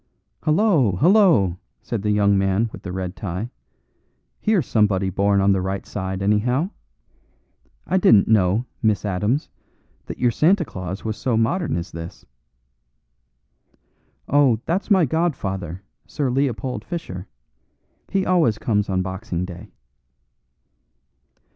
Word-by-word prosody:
"Hullo, 155 - +3
hullo!" 165 - +4 0.2
said 115 - -3
the 105 - -1
young 100 -1 +3
man 95 +3 +1
with - - -10
the 90 - -6
red 90 0 -4
tie, 100 +5 -5 0.9
"here's 210 - +1
somebody 100 -4 +1
born 100 +1 +2
on 100 +1 +4
the 95 -1 +1
right 95 +1 -3
side, 95 -1 -4
anyhow. 125 - +1 1.1
I 185 - +1
didn't 110 - +5
know, 105 +1 +2 0.2
Miss 110 -3 +1
Adams, 105 +9 0 0.6
that - - -6
your 120 -1 +2
Santa 170 - +3
Claus 95 - -7
was 110 -1 -3
so 120 0 0
modern 150 - 0
as 85 +1 -5
this." 85 +1 -9 2.0
"Oh, 135 -5 +3
that's 180 +6 -1
my 190 -5 +5
godfather, 100 - -2 0.2
Sir 140 -4 -2
Leopold 125 -2 -1
Fischer. 105 - -6 0.8
He 195 -1 0
always 165 -12 +2
comes 105 -3 0
on 95 -1 0
Boxing 95 -1 -4
Day." 90 +3 -10
105 Hz, 125 wpm, -22 LUFS, 95-145 Hz, 2.0 s, didn't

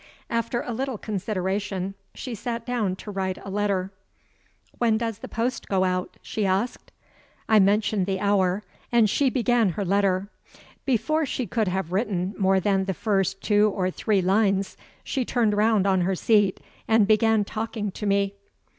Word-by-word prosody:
After 230 +1 -1
a 245 - -4
little 260 0 -3
consideration, 195 -1 -2 0.2
she 250 - -6
sat 230 +1 -4
down 225 -7 -1
to 210 - -8
write 190 -1 -2
a 195 - -6
letter. 195 -2 0 0.9
"When 230 -2 +3
does 225 -2 -3
the - - -7
post 240 +3 -2
go 190 -1 +1
out?" 185 -1 -1
she 215 - -3
asked. 195 +5 -1 0.6
I 220 -1 +5
mentioned 200 0 +2
the 190 -1 -1
hour; 200 -1 +1 0.3
and 235 -2 +5
she 270 +6 +2
began 240 -4 +2
her 200 - -3
letter. 195 0 +1 0.6
Before 300 +5 +1
she 255 - -2
could 220 -2 -1
have 180 -2 -2
written 190 -2 -1
more 190 -1 +3
than 195 0 +1
the 190 -1 -2
first 195 -2 0
two 210 0 +4
or 185 -1 0
three 200 0 0
lines, 195 0 +2 0.3
she 265 - -1
turned 225 -4 +1
round 210 -1 +3
on 190 -2 +3
her 190 +2 +1
seat, 205 0 +2 0.3
and 220 -2 +5
began 215 0 +3
talking 220 -1 -3
to 210 +2 -5
me. 200 0 +1
205 Hz, 165 wpm, -25 LUFS, 190-225 Hz, 0.9 s, I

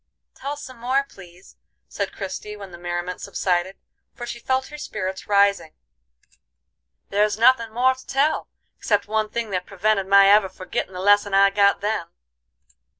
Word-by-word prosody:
"Tell 285 +2 -6
some 255 -3 -10
more, 260 +4 +1
please," 180 -3 -16 0.3
said - - -4
Christie, 210 +1 -6
when 200 -2 -10
the 175 - -11
merriment 175 +1 -4
subsided, 180 +1 -1 0.4
for 240 - -7
she 240 0 -6
felt 260 +2 -1
her 300 - -9
spirits 190 -7 -5
rising. 200 -5 +2 1.4
"There's 210 +1 +1
nothin' 230 -1 +4
more 250 +3 +3
to 260 0 -16
tell, 280 +3 +1 0.3
except - - 0
one 215 0 0
thing 230 -1 -4
that 180 -1 -3
prevented 195 0 0
my 195 0 +7
ever 200 -1 +5
forgittin' 185 0 -5
the 180 - -5
lesson 205 0 +3
I 195 0 +5
got 200 0 +3
then. 215 +2 -2
205 Hz, 155 wpm, -23 LUFS, 190-235 Hz, 1.4 s, my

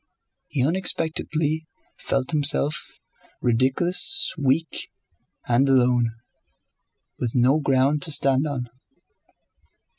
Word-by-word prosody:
He 130 -2 -1
unexpectedly 160 -2 -1 0.3
felt 135 0 -2
himself 145 -1 0 0.4
ridiculous, 155 - +2
weak, 145 +2 -1 0.6
and 125 +3 +2
alone, 125 -3 +2 1.0
with 120 0 -3
no 130 +5 +3
ground 140 +1 +1
to 155 - +3
stand 135 0 +2
on. 130 -4 -4
140 Hz, 85 wpm, -23 LUFS, 130-155 Hz, 1.0 s, no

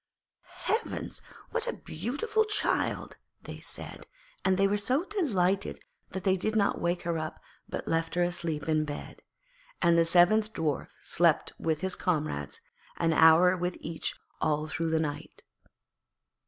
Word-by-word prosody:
'Heavens! 445 - -2 0.3
what - - +2
a 485 - 0
beautiful 440 - -1
child,' 425 -1 -1 0.3
they - - -8
said, - - -8 0.4
and 190 -1 +3
they 195 0 +4
were 200 - +1
so 255 +9 +1
delighted 200 - 0 0.3
that 190 - -5
they 190 0 +3
did 215 +4 -2
not 200 -2 +2
wake 175 +1 0
her 170 -1 -1
up 155 0 -5 0.3
but - - -5
left 165 0 0
her 175 - +3
asleep 170 -3 -1
in 155 -1 +2
bed. 145 -1 -7 0.6
And 170 0 +4
the - - +6
seventh 210 +6 +4
Dwarf 155 -4 -1 0.2
slept - - +2
with 160 -1 -1
his 190 -1 0
comrades, 145 - -2 0.4
an 165 -1 +2
hour 160 +3 +7
with 180 0 -2
each 165 0 -4 0.3
all 150 0 +1
through 165 +1 -2
the 160 0 +2
night. 150 -2 -5
175 Hz, 150 wpm, -29 LUFS, 160-200 Hz, 0.6 s, hour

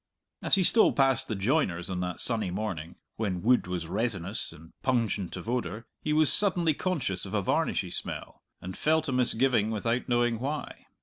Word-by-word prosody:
As - - +4
he 190 - +2
stole 220 +5 +5
past 135 -2 +2
the 110 - -2
joiner's 95 - 0
on 95 -1 -3
that 90 0 -3
sunny 110 -5 0
morning, 90 -4 -4 0.2
when 95 -5 -2
wood 125 -4 +3
was 90 -2 -3
resinous 95 +1 -2
and 80 0 -15
pungent 115 -8 0
of 90 - -8
odour, 115 -2 -2 0.2
he 150 - -2
was 155 -1 +3
suddenly 175 -6 +2
conscious 140 - -2
of 100 +1 -5
a 105 - +2
varnishy - - 0
smell, - - -6 0.2
and 90 +1 -6
felt 160 +1 +1
a - - 0
misgiving 125 -3 +4
without 115 +4 -1
knowing 120 -1 +2
why. 145 +4 -5
115 Hz, 180 wpm, -28 LUFS, 95-135 Hz, 0.2 s, stole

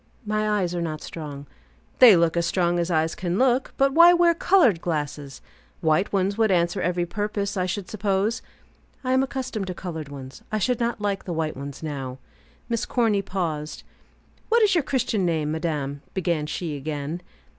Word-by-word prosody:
"My 215 0 0
eyes 190 -4 0
are 175 - -2
not 155 -2 -4
strong." 145 -3 -7 0.5
"They 240 -6 +10
look 170 -1 +2
as 170 0 +1
strong 175 -1 +1
as 170 +1 -1
eyes 160 -1 +1
can 180 0 -2
look. 255 +1 +2
But 275 0 +3
why 340 +3 +8
wear 345 -1 +5
colored 330 - +3
glasses? 145 -4 -4 0.4
White 160 +3 +1
ones 200 +2 0
would 220 -1 +4
answer 175 0 +1
every 175 0 0
purpose, 205 +1 -3
I 185 -1 0
should 185 0 -3
suppose." 205 +1 0 0.6
"I 255 0 0
am 260 - +4
accustomed 260 -6 -3
to 185 - -4
colored 160 -6 -6
ones. 135 -2 -9
I 215 - 0
should 245 +3 0
not 235 -2 -1
like 200 -2 -1
white 160 -3 -2
ones 140 +3 -8
now." 135 -4 -5 0.5
Miss 230 -2 -2
Corny 225 -5 +2
paused. 165 -6 -4 0.7
"What 465 0 +4
is 410 -2 +4
your 335 -4 +2
Christian 235 -7 0
name, 160 -4 0
madame?" 150 -4 -3
began 170 -5 0
she, 155 -1 -3
again. 150 +3 -4
180 Hz, 175 wpm, -24 LUFS, 160-215 Hz, 0.7 s, They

